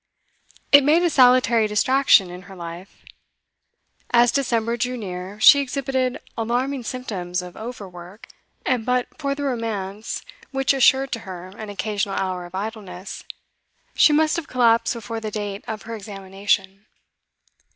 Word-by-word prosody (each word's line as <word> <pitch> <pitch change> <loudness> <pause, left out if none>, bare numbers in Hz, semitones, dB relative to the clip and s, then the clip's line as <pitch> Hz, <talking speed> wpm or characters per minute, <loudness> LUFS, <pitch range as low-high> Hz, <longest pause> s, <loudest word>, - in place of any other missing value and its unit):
It 285 0 +9
made 315 +5 +4
a 345 - +2
salutary 245 -4 +5
distraction 210 -3 +4
in 180 +1 -9
her 195 - -10
life. 170 +2 -10 1.0
As 240 0 +5
December 235 -4 0
drew 250 +2 -2
near, 190 -1 -7
she 280 +6 +8
exhibited 265 -2 -1 0.2
alarming 245 +3 -1
symptoms 185 -8 -4
of 180 -1 -10
over 220 -3 -7
work, 180 +4 -12 0.4
and 250 -3 +1
but 250 +1 0
for 280 -2 -1
the 285 - -5
romance 220 -5 -3 0.3
which 270 0 +1
assured 270 0 +4
to 230 - -2
her 185 -4 -9
an 210 +2 -9
occasional 205 -1 -2
hour 185 -2 -3
of 175 - -11
idleness, 195 -2 -6 0.7
she - - +5
must 310 +2 +3
have 335 - -4
collapsed 235 -2 +2
before 225 0 -5
the 220 -1 -4
date 205 -1 -5
of 215 -1 -5
her 230 - -7
examination. 195 -1 -3
225 Hz, 145 wpm, -22 LUFS, 195-255 Hz, 1.0 s, It